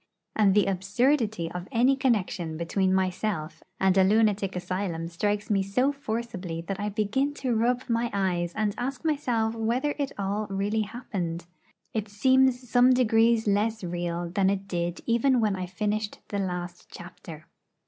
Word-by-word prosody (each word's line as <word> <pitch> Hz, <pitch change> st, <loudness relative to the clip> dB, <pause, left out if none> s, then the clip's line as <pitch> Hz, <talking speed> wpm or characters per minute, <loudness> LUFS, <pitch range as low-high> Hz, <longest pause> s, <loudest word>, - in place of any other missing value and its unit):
And 205 Hz, -3 st, +4 dB
the 210 Hz, -, +5 dB
absurdity 205 Hz, -, 0 dB
of 180 Hz, +1 st, -6 dB
any 255 Hz, +2 st, +4 dB
connection 195 Hz, -11 st, 0 dB
between 185 Hz, +3 st, 0 dB
myself 185 Hz, -3 st, -1 dB, 0.2 s
and 190 Hz, -1 st, +3 dB
a -, -, +6 dB
lunatic 205 Hz, -1 st, +2 dB
asylum 180 Hz, -2 st, -3 dB
strikes 205 Hz, +5 st, -1 dB
me 200 Hz, -1 st, +3 dB
so 250 Hz, +8 st, +1 dB
forcibly 225 Hz, -10 st, -4 dB
that 190 Hz, +3 st, -5 dB
I 205 Hz, +1 st, -1 dB
begin 225 Hz, +8 st, 0 dB
to 255 Hz, -4 st, -1 dB
rub 245 Hz, +3 st, +1 dB
my 235 Hz, 0 st, 0 dB
eyes 180 Hz, -3 st, 0 dB
and 210 Hz, -1 st, 0 dB
ask 260 Hz, +3 st, -4 dB
myself 245 Hz, -8 st, 0 dB
whether 235 Hz, +6 st, 0 dB
it 280 Hz, -1 st, -1 dB
all 205 Hz, +2 st, -2 dB
really 200 Hz, +3 st, 0 dB
happened. 195 Hz, -7 st, -4 dB, 0.5 s
It 215 Hz, -2 st, -2 dB
seems 260 Hz, +3 st, +3 dB
some 245 Hz, +2 st, +5 dB
degrees 230 Hz, -2 st, +3 dB
less 210 Hz, +1 st, +1 dB
real 175 Hz, 0 st, -3 dB
than 190 Hz, +1 st, +2 dB
it 195 Hz, 0 st, -2 dB
did 175 Hz, -2 st, -2 dB
even 245 Hz, +2 st, +3 dB
when 210 Hz, -3 st, +1 dB
I 185 Hz, -1 st, -4 dB
finished 210 Hz, +3 st, -2 dB
the 200 Hz, -, -2 dB
last 180 Hz, -2 st, -4 dB
chapter. 165 Hz, -3 st, -11 dB
205 Hz, 160 wpm, -27 LUFS, 185-235 Hz, 0.5 s, a